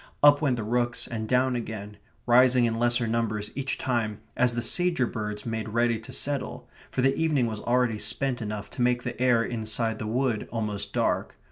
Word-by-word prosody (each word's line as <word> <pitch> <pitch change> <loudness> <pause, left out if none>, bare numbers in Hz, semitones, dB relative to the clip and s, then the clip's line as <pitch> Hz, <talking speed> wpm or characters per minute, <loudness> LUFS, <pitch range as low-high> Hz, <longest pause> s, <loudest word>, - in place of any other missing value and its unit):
Up 145 0 +7
went 140 -5 +2
the 115 - -3
rooks 120 +2 -1
and 110 -2 -4
down 125 0 +2
again, 105 -3 -5 0.3
rising 125 0 +5
in 115 - +1
lesser 120 0 +3
numbers 110 -2 -1
each 135 -1 -2
time 115 -5 -1 0.2
as 125 -1 +2
the 120 - -1
sager 175 -6 +2
birds 105 -2 -5
made 110 -1 -3
ready 115 0 +1
to 110 - -11
settle, 140 -1 -3 0.2
for 125 - -1
the 135 +1 +3
evening 155 -6 +2
was 110 -2 -3
already 120 -2 +1
spent 125 +4 -1
enough 105 -1 -4
to - - -5
make 125 0 +2
the 120 0 -5
air 125 -3 +4
inside 110 -1 -2
the 110 - -4
wood 120 -1 0
almost 105 -3 -3
dark. - - 0
120 Hz, 195 wpm, -27 LUFS, 110-125 Hz, 0.3 s, Up